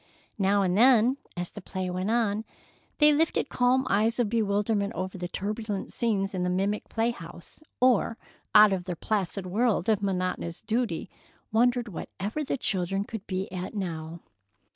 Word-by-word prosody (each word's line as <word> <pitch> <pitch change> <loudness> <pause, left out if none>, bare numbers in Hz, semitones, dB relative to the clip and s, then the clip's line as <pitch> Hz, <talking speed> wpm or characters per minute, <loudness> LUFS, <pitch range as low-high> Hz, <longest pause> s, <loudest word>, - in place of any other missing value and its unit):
Now 200 +1 +3
and 180 -1 +1
then, 245 +2 +5 0.2
as 175 0 -3
the 205 - -9
play 185 0 -4
went 185 +3 -2
on, 220 -2 +1 0.5
they 300 0 +6
lifted 315 -1 +1
calm 255 +1 +2
eyes 220 +3 +2
of 240 -4 +1
bewilderment 205 -1 0
over 185 +1 -4
the 175 -1 -4
turbulent 205 +2 -4
scenes 200 -5 0
in 185 - -2
the 180 - 0
mimic 195 +3 -1
play 225 +1 +1
house, 170 - -11 0.2
or 240 -2 +3 0.4
out 210 -1 +8
of 180 -2 -3
their 180 -2 -3
placid 195 0 -2
world 210 +1 +1
of 215 -2 +2
monotonous 185 -3 -2
duty, 220 -5 -1 0.4
wondered 240 +2 +2
whatever 205 - -5
the 275 - -2
children 195 -3 0
could 220 -1 -8
be 190 0 -2
at 185 +3 -5
now. 165 -4 -4
205 Hz, 165 wpm, -27 LUFS, 185-230 Hz, 0.5 s, out